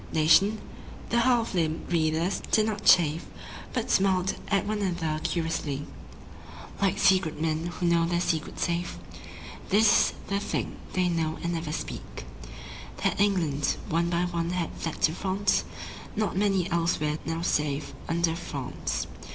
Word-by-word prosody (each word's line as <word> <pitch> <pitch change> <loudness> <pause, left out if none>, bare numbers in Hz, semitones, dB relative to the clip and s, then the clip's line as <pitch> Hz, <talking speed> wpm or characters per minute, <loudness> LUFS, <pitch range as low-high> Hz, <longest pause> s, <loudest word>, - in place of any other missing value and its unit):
Nation? 160 +7 +4 0.5
The 235 - +3
half 235 -2 +2
limbed 165 -1 -1
readers 160 +3 +1
did 215 - +4
not 215 -2 -3
chafe 160 -2 +5 0.4
But 250 -1 -2
smiled 190 -1 +2
at 200 -2 +1
one 210 0 -2
another 165 -5 -1
curiously 160 -4 -2 1.0
Like 200 0 +2
secret 185 -6 +3
men 160 +1 -1
who 175 0 -4
know 170 -1 +3
their 175 0 0
secret 160 -3 -1
safe. 170 +1 -1 0.7
This 215 +3 +5 0.2
is - - -9
the 200 0 -1
thing - - -3 0.2
they 185 -1 +2
know 165 -2 -1
and 170 0 -1
never 165 -2 -3
speak, 60 - -6 0.8
That - - +1
England 165 -9 +1
one 170 +1 +1
by 170 0 +1
one 170 -1 -2
had 180 -2 -2
fled 165 - -5
to 160 - +4
France 195 +2 0 0.5
(Not 215 -3 -1
many 195 -2 +2
elsewhere 160 -3 0
now 165 0 -3
save 150 -3 -1 0.2
under 165 0 +1
France). 140 -6 -4
170 Hz, 145 wpm, -27 LUFS, 160-195 Hz, 1.0 s, chafe